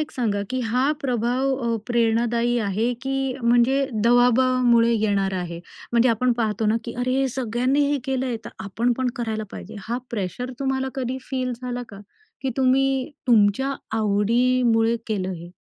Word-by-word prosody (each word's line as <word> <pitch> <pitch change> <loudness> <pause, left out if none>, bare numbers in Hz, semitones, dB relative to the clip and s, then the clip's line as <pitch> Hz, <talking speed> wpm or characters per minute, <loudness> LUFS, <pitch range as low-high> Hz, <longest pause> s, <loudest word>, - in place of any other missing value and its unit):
एक 305 - -3
सांगा 215 -6 -1
की 255 0 -1
हा 250 +4 +1
प्रभाव 250 +1 0
अ, 230 -1 +1
प्रेरणादायी 235 0 +1
आहे 220 +5 0
की 270 0 -2 0.3
म्हणजे 245 +4 +3 0.2
दवाबामुळे 245 -1 +4
येणारा 200 -4 +1
आहे? 170 -1 -5 0.3
म्हणजे 235 +1 +4
आपण 245 +2 +2
पाहतो 220 -1 0
ना, 215 +2 +3
की 235 - -6
अरे 250 +1 0
हे 270 - +1
सगळ्यांनी 255 +3 0
हे 290 - +1
केलंय 260 -2 -1
तर - - -6 0.2
आपण 230 +5 0
पण 260 -1 +1
करायला 220 -3 -3
पाहिजे. 90 -2 -9
हा 240 +1 -1
प्रेशर 230 +4 -3
तुम्हाला 265 -1 -1
कधी 260 0 -3
फील 255 -2 -1
झाला 245 0 -3
का 200 -1 -11 0.4
की 265 - -1
तुम्ही 265 +1 +2 0.2
तुमच्या 235 +4 +3 0.2
आवडीमुळे 230 +2 +2
केलं 190 -4 -2
हे? 170 0 -9
240 Hz, 155 wpm, -23 LUFS, 220-255 Hz, 0.4 s, दवाबामुळे